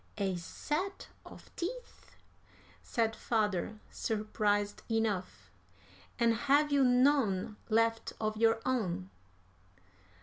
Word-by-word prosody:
"A 195 -3 0
set 305 - -4 0.2
of - - -14
teeth!" 485 +8 -6 0.7
said 225 -1 0
father, 215 -2 -1
surprised 210 -1 -1
enough. 220 -5 -2 0.7
"And 235 -1 +3
have 285 +5 +3
you 280 -1 +4
none 245 -6 +3
left 225 0 +1
of 215 0 -1
your 225 +1 +3
own?" 185 - -1
225 Hz, 95 wpm, -32 LUFS, 205-255 Hz, 0.7 s, you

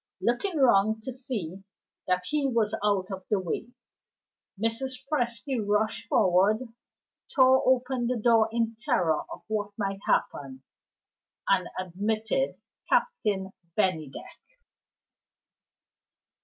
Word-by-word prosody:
Looking 315 +9 0
round 220 -4 +4
to 260 - -4
see 215 - -5 0.4
that 180 0 +1
he 295 +5 0
was 225 -4 +1
out 200 -2 +1
of 190 -1 -5
the 210 - +2
way, 185 +5 -3 0.9
Mrs. 255 +4 -2
Presty 240 -3 -1
rushed 210 +1 0
forward 205 +5 +3 0.7
tore 260 -1 +6
open 255 -1 +2
the 250 0 0
door 225 -1 +4
in 230 -1 0
terror 205 - +1
of - - -8
what 210 -1 -2
might 195 -2 -2
happen 135 -2 -1 0.8
and - - +3
admitted 215 - -1 0.3
Captain 205 - +1 0.3
Bennydeck. 160 -9 -2
220 Hz, 105 wpm, -28 LUFS, 195-250 Hz, 0.9 s, tore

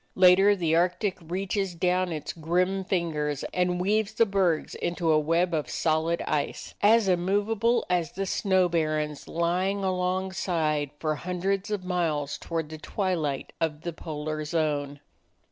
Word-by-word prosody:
Later 190 +2 +6
the 165 -4 +1
Arctic 180 +3 +1
reaches 190 +2 -2
down 180 +1 +1
its 155 -2 -4
grim 180 +4 0
fingers 155 -6 -1
and 180 0 +1
weaves 210 +3 +1
the 230 +1 +4
bergs 190 -6 +1
into 170 -1 -1
a 155 - +5
web 165 +3 +1
of 155 -2 -1
solid 160 +1 0
ice, 150 -2 -2
as 220 0 +5
immovable 205 +6 +1
as 175 -4 0
the 195 +1 -2
snow 190 -1 +2
barrens 155 -3 -1
lying 185 +4 0
along 185 0 0
side 155 -6 0
for 155 0 -1
hundreds 185 +4 -2
of 205 -3 -3
miles 160 -6 -1
toward 165 -2 -3
the 155 0 -8
twilight 165 -7 -2
of 155 -2 -1
the 170 0 -4
polar 155 -1 -4
zone. 150 -3 -1
175 Hz, 145 wpm, -27 LUFS, 155-190 Hz, -, Later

